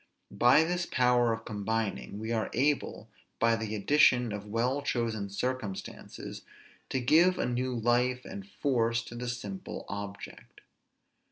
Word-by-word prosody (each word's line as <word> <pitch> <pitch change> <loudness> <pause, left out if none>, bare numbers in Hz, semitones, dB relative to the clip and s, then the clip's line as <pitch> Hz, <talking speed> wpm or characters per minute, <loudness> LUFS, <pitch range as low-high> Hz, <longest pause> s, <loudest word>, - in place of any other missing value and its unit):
By 120 +9 +5
this 175 +1 -1
power 125 -1 +3
of 115 0 -4
combining 105 -1 -2
we 110 +2 -4
are 110 -2 0
able, 140 +4 0 0.3
by 115 0 +3
the 110 -1 -3
addition 125 0 +4
of 105 0 -6
well 120 +6 0
chosen 115 -7 -1
circumstances, 105 -1 -5 0.5
to 130 - 0
give 170 +8 +4
a - - 0
new 125 +1 -1
life 125 +2 +1
and 200 0 -8
force 115 - 0
to 115 - -10
the 120 +1 -4
simple 180 +10 -6
object. 100 0 -8
120 Hz, 140 wpm, -30 LUFS, 110-130 Hz, 0.5 s, By